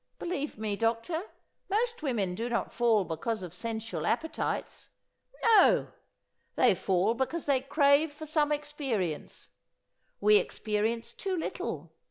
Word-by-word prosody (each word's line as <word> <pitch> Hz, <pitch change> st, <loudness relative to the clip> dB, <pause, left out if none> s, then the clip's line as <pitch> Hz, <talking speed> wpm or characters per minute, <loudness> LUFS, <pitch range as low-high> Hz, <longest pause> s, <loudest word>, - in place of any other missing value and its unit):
Believe 305 Hz, -7 st, -3 dB
me, 215 Hz, -1 st, -2 dB
doctor, 230 Hz, -, -1 dB, 0.4 s
most 465 Hz, +2 st, 0 dB
women 220 Hz, -11 st, -1 dB
do 230 Hz, +6 st, -3 dB
not 235 Hz, -, -1 dB
fall 230 Hz, -4 st, +3 dB
because 185 Hz, +6 st, -3 dB
of 175 Hz, -2 st, -7 dB
sensual 220 Hz, -5 st, -4 dB
appetites. 320 Hz, +7 st, -2 dB, 0.5 s
No! 455 Hz, -2 st, +5 dB, 0.7 s
they -, -, +5 dB
fall 190 Hz, +3 st, +1 dB
because 265 Hz, +7 st, -2 dB
they 275 Hz, -3 st, +2 dB
crave 280 Hz, +2 st, +3 dB
for 310 Hz, +2 st, -9 dB
some 300 Hz, -1 st, +1 dB
experience. 275 Hz, -, -3 dB, 0.7 s
We 425 Hz, 0 st, +6 dB
experience 230 Hz, -, -1 dB
too 380 Hz, -2 st, -3 dB
little. 325 Hz, -, -4 dB
240 Hz, 125 wpm, -30 LUFS, 215-310 Hz, 0.7 s, We